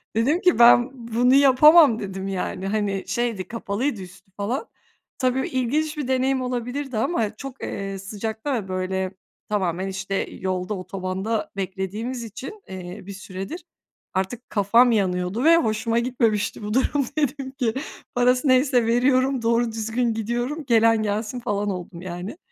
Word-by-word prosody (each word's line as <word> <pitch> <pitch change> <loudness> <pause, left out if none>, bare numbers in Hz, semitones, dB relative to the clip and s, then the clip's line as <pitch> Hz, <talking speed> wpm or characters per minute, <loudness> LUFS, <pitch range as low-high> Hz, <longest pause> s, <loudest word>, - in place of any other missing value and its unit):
dedim 280 +11 +2
ki 360 -7 +3
"Ben 240 +1 +7 0.2
bunu 245 +3 +3
yapamam." 280 -1 +7
dedim 195 -1 -5
yani, 190 0 -3
hani, 200 -2 -1
şeydi, 215 -2 -2
kapalıydı 225 +2 -2
üstü 185 +1 -13
falan. 235 - -2 0.5
Tabii 255 0 0
ilginç 295 +5 -1
bir 290 -4 -3
deneyim 260 0 +1
olabilirdi 250 +1 -3
ama 220 -3 0
çok, 270 +3 -9
eee, 195 -1 -4
sıcakta 220 +7 -4
ve, 210 -5 -3
böyle, 185 0 -2 0.4
tamamen, 190 -3 -1
işte, 195 0 -4 0.2
yolda, 185 +1 -3
otobanda 190 +3 -3
beklediğimiz 200 +6 -4
için, 255 - -8
eee, 180 -1 -7
bir 200 - -7
süredir 195 - -7 0.5
artık 195 +7 -3
kafam 230 +4 +4
yanıyordu 185 +1 0
ve 330 +2 +7
hoşuma 225 -4 +1
gitmemişti 225 -4 0
bu 210 +1 -3
durum 270 +2 +2
dedim 280 -2 -1
ki, 250 -5 -1 0.4
"Parası 250 +3 +3
neyse 255 -2 +4
veriyorum, 255 +2 +2
doğru 230 0 +2
düzgün 225 +2 -1
gidiyorum, 240 +7 -3
gelen 225 -2 +4
gelsin." 215 +3 -2
falan 205 -3 -1
oldum 180 -2 -6
yani. 185 - -6
225 Hz, 140 wpm, -23 LUFS, 195-255 Hz, 0.5 s, Ben